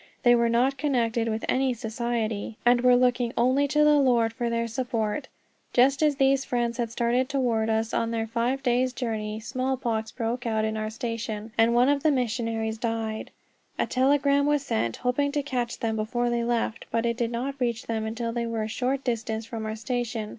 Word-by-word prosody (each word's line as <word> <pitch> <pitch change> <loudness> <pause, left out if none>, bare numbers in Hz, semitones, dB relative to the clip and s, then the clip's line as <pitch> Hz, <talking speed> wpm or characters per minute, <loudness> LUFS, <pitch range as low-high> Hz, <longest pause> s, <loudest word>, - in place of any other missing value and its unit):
They 240 - +6
were 235 -1 +3
not 255 +4 +2
connected 235 -5 +1
with 220 0 -2
any 260 -1 +1
Society, 225 -2 -3
and 240 0 +5
were 250 0 +6
looking 245 -1 +2
only 260 +4 +3
to 300 +2 +3
the 300 -1 +5
Lord 240 -4 +3
for 240 -1 -2
their 230 0 -1
support. 230 +1 -2 0.5
Just 265 +3 +4
as 300 -2 +3
these 270 0 +3
friends 240 -2 -1
had 235 -1 0
started 245 +2 +1
toward 240 -6 0
us, 220 0 0
on 230 - 0
their 225 -1 -1
five 240 +4 -1
days' 250 0 +1
journey, 220 -4 -3
smallpox 240 -2 -2
broke 235 +1 -3
out 220 -1 +1
at 220 0 -2
our 215 0 -2
station, 225 -2 -4
and 230 +1 +3
one 245 +2 +5
of 285 0 +2
the 310 - +3
missionaries 230 -4 -1
died. 225 -1 -3 0.5
A - - +1
telegram 280 +2 +2
was 295 -1 +2
sent, 115 - -1
hoping 285 +3 0
to 290 -1 0
catch 245 -4 -2
them 220 -1 -1
before 240 +3 -1
they 235 0 0
left, 235 -1 -1
but 230 0 0
it 235 0 +1
did 235 -1 -1
not 260 +4 -4
reach 240 -2 -1
them 220 -1 -2
until 230 +1 -3
they 235 -1 -2
were 225 -1 -2
a - - -3
short 260 +4 -1
distance 225 -2 -2
from 225 -1 -5
our 215 - -3
station. 225 -1 -3
235 Hz, 200 wpm, -26 LUFS, 225-255 Hz, 0.5 s, They